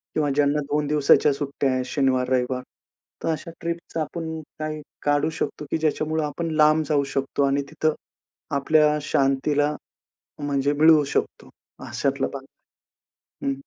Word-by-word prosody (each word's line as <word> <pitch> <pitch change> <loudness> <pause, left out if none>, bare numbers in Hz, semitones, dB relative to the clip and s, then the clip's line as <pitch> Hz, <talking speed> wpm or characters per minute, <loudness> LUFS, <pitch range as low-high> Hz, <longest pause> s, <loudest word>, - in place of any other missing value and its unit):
किंवा 150 -2 +1
ज्यांना 145 0 +2
2 150 0 +1
दिवसाच्या 145 0 +4
सुट्ट्या 140 -1 -1
आहेत, 130 0 -1
शनिवार-रविवार, 130 -2 +1 0.6
तर - - 0
अशा 160 +2 -3
ट्रिपच 170 0 -5
आपण 160 +1 -3 0.3
काही 155 0 -4 0.2
काढू 145 +1 +2
शकतो, 150 - -3
की - - +2
ज्याच्यामुळं 155 0 0
आपण 165 +3 -3
लांब 155 +1 +5
जाऊ 145 -2 +3
शकतो 135 +1 0
आणि 140 +1 +2
तिथं 155 +1 0 0.6
आपल्या 150 +2 +3
शांतीला 145 +2 +1 0.6
म्हणजे 145 -1 0
मिळवू 155 +1 +6
शकतो, 140 - -3 0.4
अशातला 135 -1 -1
भाग, 135 -1 -7 1.0
हं. 140 - +1
145 Hz, 130 wpm, -24 LUFS, 140-155 Hz, 1.0 s, मिळवू